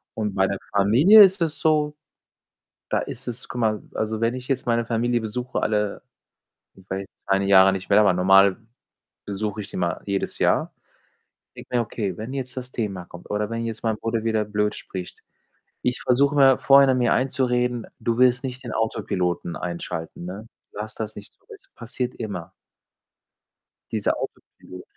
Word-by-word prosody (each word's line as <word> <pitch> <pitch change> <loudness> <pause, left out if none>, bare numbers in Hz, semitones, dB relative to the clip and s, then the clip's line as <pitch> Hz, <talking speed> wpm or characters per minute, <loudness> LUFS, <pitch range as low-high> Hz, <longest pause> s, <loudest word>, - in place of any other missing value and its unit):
Und 105 -2 -2
bei 95 0 +3
der 100 - -2 0.2
Familie 130 - +7
ist 190 -1 +3
es 155 -2 -2
so, 150 -1 +2 0.9
da - - +1
ist 130 +3 -7
es 120 0 -5
guck 125 - -5
mal, 110 -2 0
also, 110 0 -2
wenn 115 +2 +1
ich 125 0 -7
jetzt 135 -2 -1
meine 115 0 +1
Familie 120 +1 0
besuche, 125 +3 -3
alle 105 -1 -1 0.7
ich 95 -1 -20
war 95 - -1
jetzt 95 - -10
2, 95 -1 +3
ne, 100 - -1
Jahre 95 0 +7
nicht 95 0 -5
mehr, 100 - +6
aber 100 -3 +5
normal 95 +1 +5 0.7
besuche 105 +1 -3
ich 95 - -9
die - - -16
immer 85 -1 -1
jedes 100 -1 -2
Jahr - - +1 0.8
denke - - -11
mir: 120 - +3
„Okay, 100 -5 -4
wenn 110 +4 -6
jetzt 130 -2 -5
das 130 0 -6
Thema 100 -6 -3
kommt 90 - -13
oder 105 +1 -1
wenn 115 0 -3
jetzt 110 -1 -5
mein 110 -1 +1
Bruder 115 -1 -2
wieder 110 -2 +1
blöd 105 0 0
spricht,“ 90 -2 -8 0.6
ich 125 0 -1
versuche 140 +3 +2
immer 135 -2 +6
vorhinein 135 -2 +5
mir 120 -1 +2
einzureden: 125 -2 0
„Du 115 0 -1
willst 125 -1 +4
nicht 130 0 -6
den 120 - -5
Autopiloten 90 -6 -2
einschalten, 85 -1 -5
ne? 100 +5 -8 0.2
Lass 105 +1 -6
das 110 -1 -5
nicht 105 - -11
zu,“ - - -44
es - - -19
passiert 125 +1 -4
immer 95 -6 -6 1.4
dieser - - 0
Autopilot. 90 0 -9
110 Hz, 180 wpm, -23 LUFS, 100-125 Hz, 1.4 s, Familie